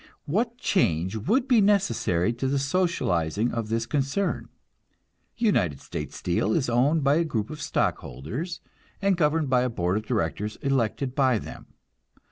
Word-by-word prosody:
What 230 - -1
change 95 - +1
would 230 - +1
be 245 -4 +5
necessary 120 - +2
to 125 +3 -2
the 140 +1 +1
socializing 125 - 0
of 115 -2 -3
this 115 0 0
concern? 140 - -1 0.9
United 90 - +1
States - - -6
Steel 90 +4 0
is 130 -6 0
owned 140 +6 +3
by 140 +2 +4
a 170 - +3
group 115 -9 -2
of 155 -1 -7
stockholders, 140 - -3 0.4
and 195 -1 +2
governed 155 -3 +1
by 125 -1 +4
a 125 - +1
board 90 -4 0
of 110 0 -5
directors 105 -2 -1
elected 135 -1 0
by 130 -3 +3
them. - - -9
130 Hz, 150 wpm, -26 LUFS, 110-165 Hz, 0.9 s, be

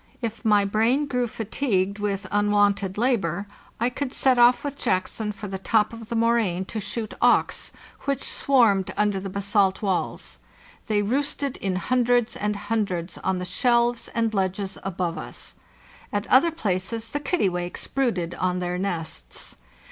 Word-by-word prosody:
If 230 -1 -4
my 210 -3 +4
brain 225 +8 +2
grew 250 -3 0
fatigued 210 -3 -1
with 200 -1 -2
unwonted 205 -2 +2
labor, 205 -7 +1 0.3
I 240 +2 +1
could 270 0 -4
set 260 -2 +3
off 240 +1 +6
with 285 -1 -3
Jackson 210 -1 -1
for 205 0 -7
the 190 -1 -5
top 215 +2 +2
of 225 -1 -9
the 235 - -2
moraine 225 -6 +2
to 220 - -1
shoot 215 +1 -4
auks, - - +3 0.3
which 275 -1 -1
swarmed 225 -9 +3
under 205 -2 +2
the 195 +1 -5
basalt 200 0 +1
walls. 190 -3 -2 0.5
They 210 -2 +2
roosted 280 +4 -1
in 190 -2 -2
hundreds 245 +5 +2
and 210 0 -1
hundreds 200 -4 -2
on 190 - 0
the 180 - -3
shelves 235 +5 +2
and 230 -1 +1
ledges 195 0 -1
above 180 -2 -2
us; - - -6 0.6
at 205 -1 -1
other 270 +6 +6
places 225 - -2
the 290 - -2
kittiwakes 185 - -1
brooded 220 -11 -1
on 180 0 -1
their 180 0 -2
nests. 170 -5 -5
210 Hz, 155 wpm, -25 LUFS, 190-240 Hz, 0.6 s, off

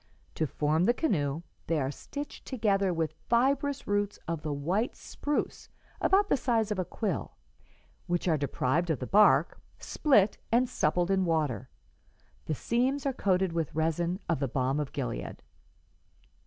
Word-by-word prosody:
To 155 - -1
form 155 +5 +1
the 240 - +3
canoe, 160 - 0 0.2
they 165 -2 +1
are 135 -1 -1
stitched 285 - -8
together 200 -6 +1
with 160 -2 -1 0.2
fibrous 275 +3 +2
roots 205 0 0
of 165 -2 -2
the 155 - -3
white 175 - -1
spruce 290 0 -3 0.3
about 400 +1 +4
the - - +3
size 225 -5 +1
of 205 - -1
a 185 - 0
quill, 185 - -3 0.7
which 175 +1 -1
are 165 - +4
deprived 145 +3 0
of 160 - +1
the 125 - -5
bark, 210 +8 +4 0.2
split 220 -10 +2
and 245 +2 +4
suppled 175 -1 +1
in 190 -1 +3
water. 150 - 0 0.8
The 155 - 0
seams 255 - 0
are 275 - +1
coated 190 -6 +1
with 165 -3 -2
resin 170 +3 0
of 165 - 0
the 135 - 0
balm 130 +3 0
of 145 -2 -3
Gilead. 125 -6 -4
175 Hz, 155 wpm, -29 LUFS, 150-225 Hz, 0.8 s, about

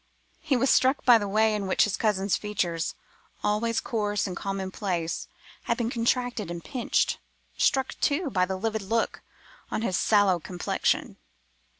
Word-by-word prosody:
He 295 -6 +1
was 270 +2 +3
struck 260 +2 +3
by 240 -2 +8
the 205 - -3
way 215 +2 +3
in 205 -2 -2
which 185 - +3
his 210 - 0
cousin's 200 -3 +1
features—always 210 +4 -2
coarse 210 -3 -1
and 185 -3 -4
common 195 0 -4
place—had 175 -5 -4
become 235 -1 -1
contracted 240 -4 0
and 170 -1 -6
pinched; 255 -4 0 0.4
struck, 265 -1 +1
too, 290 0 +1
by 185 -3 +2
the 190 0 -2
livid 220 +2 -2
look 225 +4 -1 0.5
on 220 - -2
his 185 -6 0
sallow 205 -4 +3
complexion. 175 +2 -1
210 Hz, 150 wpm, -27 LUFS, 190-235 Hz, 0.5 s, by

